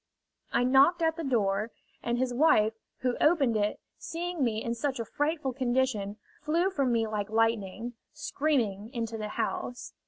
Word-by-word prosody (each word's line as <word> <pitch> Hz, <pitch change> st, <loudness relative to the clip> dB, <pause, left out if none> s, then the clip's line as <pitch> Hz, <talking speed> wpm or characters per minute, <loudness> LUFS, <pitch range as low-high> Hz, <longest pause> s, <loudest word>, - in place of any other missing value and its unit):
I -, -, +2 dB
knocked 275 Hz, +7 st, +5 dB
at 320 Hz, 0 st, +2 dB
the 330 Hz, -, -5 dB
door, 215 Hz, -5 st, +1 dB, 0.3 s
and 240 Hz, 0 st, -1 dB
his 250 Hz, 0 st, 0 dB
wife, 240 Hz, -6 st, +4 dB, 0.3 s
who 250 Hz, -1 st, 0 dB
opened 290 Hz, -8 st, +4 dB
it, 210 Hz, -1 st, 0 dB, 0.2 s
seeing 345 Hz, -2 st, -3 dB
me 225 Hz, -3 st, 0 dB
in 235 Hz, -, -1 dB
such 260 Hz, +2 st, -2 dB
a 230 Hz, -, -2 dB
frightful 290 Hz, +2 st, -1 dB
condition, 240 Hz, -5 st, 0 dB, 0.2 s
flew 335 Hz, +6 st, +1 dB
from 275 Hz, -8 st, +1 dB
me 230 Hz, -1 st, +2 dB
like 210 Hz, -1 st, -3 dB
lightning, 225 Hz, 0 st, 0 dB, 0.2 s
screaming, 260 Hz, -9 st, -1 dB
into 230 Hz, -1 st, -2 dB
the 215 Hz, -, -3 dB
house. 245 Hz, +3 st, -3 dB
245 Hz, 160 wpm, -29 LUFS, 220-290 Hz, 0.3 s, knocked